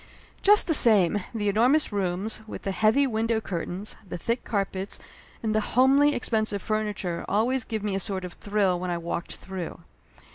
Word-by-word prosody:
Just 415 Hz, +1 st, +6 dB
the 335 Hz, -, +2 dB
same, 205 Hz, -, +6 dB
the 215 Hz, -3 st, -3 dB
enormous 245 Hz, +10 st, +3 dB
rooms, 195 Hz, +3 st, -2 dB
with -, -, -8 dB
the 195 Hz, -, -2 dB
heavy 220 Hz, +8 st, +3 dB
window 225 Hz, -2 st, 0 dB
curtains, 185 Hz, 0 st, -5 dB
the -, -, -4 dB
thick 230 Hz, +8 st, -2 dB
carpets 195 Hz, -2 st, -3 dB, 0.5 s
and 220 Hz, -1 st, 0 dB
the 215 Hz, -, +2 dB
homely, 275 Hz, +6 st, +3 dB
expensive 215 Hz, -4 st, -2 dB
furniture 210 Hz, -5 st, -2 dB
always 240 Hz, +5 st, +1 dB
give 220 Hz, -3 st, -5 dB
me 205 Hz, -2 st, -2 dB
a 195 Hz, -, -1 dB
sort 190 Hz, -2 st, -3 dB
of 180 Hz, -, -8 dB
thrill 200 Hz, -3 st, 0 dB
when 180 Hz, 0 st, -4 dB
I 175 Hz, -, -1 dB
walked 170 Hz, 0 st, -5 dB
through. 185 Hz, -4 st, -7 dB
210 Hz, 175 wpm, -26 LUFS, 190-230 Hz, 0.5 s, Just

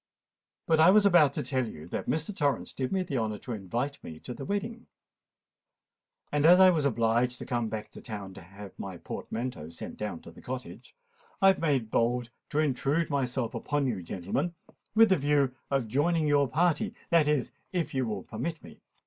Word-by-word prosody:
"But 160 Hz, -1 st, +3 dB
I 160 Hz, +3 st, +8 dB
was 205 Hz, +2 st, +6 dB
about 175 Hz, -7 st, +6 dB
to -, -, -2 dB
tell 130 Hz, -4 st, -1 dB
you 75 Hz, -3 st, -10 dB
that -, -, -4 dB
Mr. 160 Hz, +6 st, -1 dB
Torrens 145 Hz, -5 st, 0 dB
did 130 Hz, -1 st, -3 dB
me 190 Hz, -1 st, +1 dB
the 140 Hz, -7 st, -2 dB
honour 110 Hz, -2 st, -2 dB
to 125 Hz, -, -8 dB
invite 120 Hz, +8 st, -3 dB
me 80 Hz, -1 st, -8 dB
to 125 Hz, -, -6 dB
the 135 Hz, -, -7 dB
wedding; 220 Hz, -, -3 dB, 1.4 s
and 145 Hz, -1 st, +1 dB
as 175 Hz, +3 st, +8 dB
I 185 Hz, -1 st, +8 dB
was 155 Hz, -5 st, 0 dB
obliged 120 Hz, 0 st, +1 dB
to -, -, -7 dB
come 120 Hz, -2 st, -1 dB
back 110 Hz, -1 st, -5 dB
to -, -, -11 dB
town 100 Hz, -5 st, -7 dB
to 95 Hz, -, -11 dB
have 100 Hz, +2 st, -11 dB
my 95 Hz, -2 st, -6 dB
portmanteau 115 Hz, -5 st, -5 dB
sent 85 Hz, -, -8 dB
down 105 Hz, -6 st, -4 dB
to -, -, -12 dB
the -, -, -15 dB
Cottage, -, -, -7 dB, 0.4 s
I 195 Hz, -, +7 dB
have 190 Hz, -, +2 dB
made 135 Hz, -9 st, 0 dB
bold 120 Hz, +1 st, +1 dB, 0.2 s
to -, -, -3 dB
intrude 150 Hz, +2 st, +1 dB
myself 130 Hz, -3 st, -1 dB
upon 145 Hz, -1 st, -1 dB
you, 115 Hz, -8 st, -1 dB
gentlemen, 100 Hz, -, -3 dB, 0.4 s
with 225 Hz, 0 st, +7 dB
the 190 Hz, -, +4 dB
view 140 Hz, -2 st, +2 dB, 0.2 s
of 135 Hz, -4 st, 0 dB
joining 155 Hz, +7 st, +1 dB
your 145 Hz, -1 st, +3 dB
party—that 170 Hz, -, +1 dB
is, 150 Hz, -4 st, +1 dB, 0.2 s
if 175 Hz, -3 st, -2 dB
you 130 Hz, -2 st, 0 dB
will 105 Hz, -4 st, -3 dB
permit 155 Hz, +9 st, -5 dB
me." -, -, -14 dB
135 Hz, 195 wpm, -29 LUFS, 110-160 Hz, 1.4 s, I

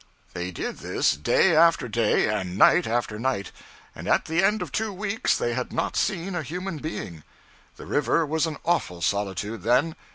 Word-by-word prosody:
They 90 Hz, +1 st, -4 dB
did 90 Hz, -, -5 dB
this -, -, +1 dB
day 160 Hz, -, +3 dB
after 165 Hz, -3 st, +4 dB
day 110 Hz, -1 st, +2 dB
and 95 Hz, -4 st, -2 dB
night 175 Hz, +9 st, +5 dB
after 110 Hz, -2 st, -1 dB
night; 120 Hz, -5 st, -2 dB, 0.4 s
and -, -, -9 dB
at -, -, +2 dB
the 165 Hz, +4 st, +1 dB
end 210 Hz, +2 st, +2 dB
of -, -, -9 dB
two 220 Hz, -1 st, -1 dB
weeks 210 Hz, +4 st, -1 dB
they 120 Hz, -, -1 dB
had 125 Hz, +1 st, -3 dB
not -, -, -2 dB
seen 190 Hz, 0 st, -1 dB
a 175 Hz, -, -2 dB
human 180 Hz, +4 st, -5 dB
being. 90 Hz, -, -6 dB, 0.5 s
The -, -, -11 dB
river 155 Hz, +2 st, +1 dB
was 160 Hz, +2 st, 0 dB
an 155 Hz, -2 st, -5 dB
awful 90 Hz, -, 0 dB
solitude, 100 Hz, +3 st, -2 dB
then. 130 Hz, +8 st, +2 dB
140 Hz, 185 wpm, -25 LUFS, 105-170 Hz, 0.5 s, night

